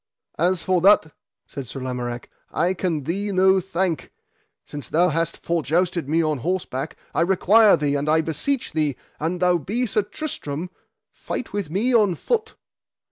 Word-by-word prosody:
As 175 +1 +1
for 185 -2 +2
that, 180 -5 +5 0.3
said 135 -3 -7
Sir 135 - -6
Lamorak, 125 -2 -4 0.2
I 175 +4 +1
can 170 -5 -2
thee 195 +7 -2
no 190 0 +4
thank; 175 -5 -2 0.5
since 145 -1 -8
thou 175 +3 +3
hast 165 +1 -1
for 170 -1 -1
jousted 170 0 0
me 165 +2 +2
on 155 -3 0
horseback 160 -2 -3 0.2
I - - +1
require 200 +4 +5
thee 145 -1 0
and 145 +1 -1
I 160 +1 +4
beseech 165 - -2
thee, 150 -4 0 0.2
an 165 +4 -1
thou 180 -1 +3
be 225 - -1
Sir 210 -1 +1
Tristram, 185 - -5 0.4
fight 250 - -6
with 200 -6 -2
me 215 +10 0
on 210 -6 +4
foot. 445 - -2
170 Hz, 165 wpm, -23 LUFS, 150-190 Hz, 0.5 s, that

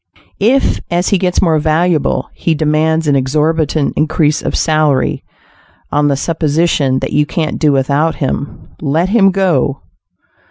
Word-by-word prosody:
If, 250 +7 +2
as 175 +1 0
he 200 - +2
gets 180 -1 0
more 160 -3 +2
valuable, 155 +1 0
he 165 - -1
demands 155 +1 0
an 145 - +3
exorbitant 150 +2 0
increase 155 -1 +1
of - - -3
salary; 155 -4 +1 0.7
on 145 0 +1
the 140 -1 +1
supposition 155 -3 0
that - - -4
you 150 0 +2
can't 155 0 -3
do 150 -2 +3
without 140 +4 +1
him, 140 0 -4
let 160 +5 0
him 200 -2 +4
go. 170 -8 0
155 Hz, 145 wpm, -14 LUFS, 145-170 Hz, 0.7 s, him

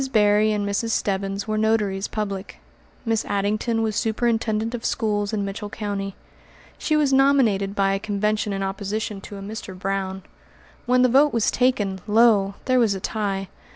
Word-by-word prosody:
Berry 210 -1 +4
and 205 -1 -1
Mrs. 200 +3 -1
Stebbins 195 -1 -1
were 215 0 0
notaries 210 -3 +1
public. 200 -3 -4 0.5
Miss 225 -1 +1
Addington 215 +3 0
was 215 -2 -1
superintendent 225 -1 0
of 240 -1 -5
schools 205 -3 0
in 205 -2 -1
Mitchell 205 +1 -5
County. 200 -2 -4 0.6
She 310 - 0
was 290 -3 +2
nominated 245 -8 +3
by 195 -1 +2
a 195 - -1
convention 210 0 -1
in 195 0 -2
opposition 200 +1 -3
to 200 - -9
a 195 - -8
Mr. 200 -2 -7
Brown. 190 0 -3 0.6
When 250 +1 +4
the - - +6
vote 280 +4 +4
was 230 -2 +2
taken, 210 -7 +1
lo! 210 -3 +4
there 255 -1 +3
was 220 -5 +3
a - - -4
tie. 195 -1 -2
210 Hz, 165 wpm, -23 LUFS, 195-225 Hz, 0.6 s, the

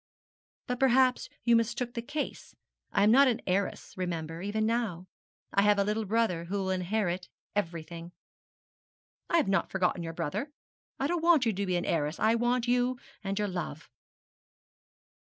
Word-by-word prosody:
'But 250 0 -3
perhaps 260 -1 +3
you 235 -1 +5
mistook 235 +2 0
the 235 - -3
case. 290 +4 -5 0.4
I 200 - +3
am 210 - +6
not 275 +3 +7
an 240 -3 +1
heiress, 195 +1 -1
remember, 165 -3 -4
even 210 +3 -1
now. 220 -6 -1 0.5
I 200 - +4
have 205 0 +4
a 200 - +3
little 210 +2 -1
brother 200 -5 +1
who 195 +4 -2
will 190 -1 -1
inherit 185 -1 -1 0.3
everything.' 170 -2 -4 1.2
'I 340 - +3
have 315 - +2
not 195 0 +1
forgotten 185 -2 0
your 165 -1 -5
brother. 210 - -3 0.5
I 270 - 0
don't 340 +3 0
want 335 -6 +5
you 225 - +2
to 200 +1 -2
be 180 - +1
an 175 - -1
heiress. 155 -1 -1
I 220 +1 +4
want 240 +1 +1
you 245 +1 +2 0.3
and 195 0 -2
your 210 -1 +1
love.' 175 -6 -5
205 Hz, 170 wpm, -30 LUFS, 180-240 Hz, 1.2 s, not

